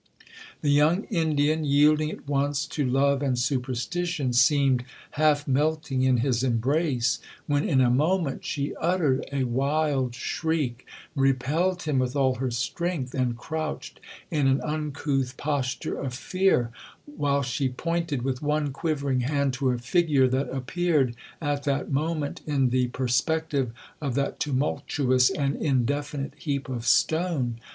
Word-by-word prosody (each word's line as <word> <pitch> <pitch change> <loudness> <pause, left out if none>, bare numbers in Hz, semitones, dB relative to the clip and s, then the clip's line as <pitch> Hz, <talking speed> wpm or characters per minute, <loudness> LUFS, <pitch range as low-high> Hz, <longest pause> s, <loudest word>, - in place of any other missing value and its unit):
The 145 - +2
young 155 +7 +4
Indian, 155 -3 +1
yielding 150 +2 +4
at 145 - -9
once 145 +1 0
to 150 - -2
love 135 +2 +2
and 135 -3 0
superstition, 130 +4 -1
seemed 130 0 +4 0.3
half 150 -1 +2
melting 145 -1 0
in 130 -1 +3
his 125 -4 +1
embrace, 130 0 +1 0.3
when, 145 0 0
in 130 -2 +4
a 125 -1 +4
moment, 155 +2 +1
she 140 -1 -2
uttered 165 -6 +1
a 140 -1 0
wild 135 0 0
shriek, 140 -2 -2 0.3
repelled 145 +7 +1
him 150 -4 +1
with 130 +1 -1
all 135 -2 +3
her 130 0 -1
strength, 130 +3 -2
and 125 -3 0
crouched 155 +4 -5 0.3
in 150 -4 +2
an 135 +1 +3
uncouth 145 -4 -2
posture 140 -3 -2
of 130 -3 -4
fear, 185 -7 +1 0.3
while 145 - 0
she 130 +1 -1
pointed 165 0 -2
with 130 -1 -2
one 150 -1 0
quivering 140 -4 -1
hand 140 +1 0
to 130 +1 0
a 125 - +1
figure 135 +1 +2
that 130 +2 -1
appeared, 135 -1 0 0.2
at 145 -2 -1
that 140 0 -1
moment, 150 +1 -1
in 135 -4 +2
the 125 0 +2
perspective 135 +2 0 0.3
of 140 -5 -2
that 140 0 -1
tumultuous 130 -2 +1
and 140 -1 -1
indefinite 140 +1 -1
heap 140 -3 -3
of 120 -2 -4
stone. 155 -6 +1
140 Hz, 140 wpm, -26 LUFS, 130-155 Hz, 0.3 s, young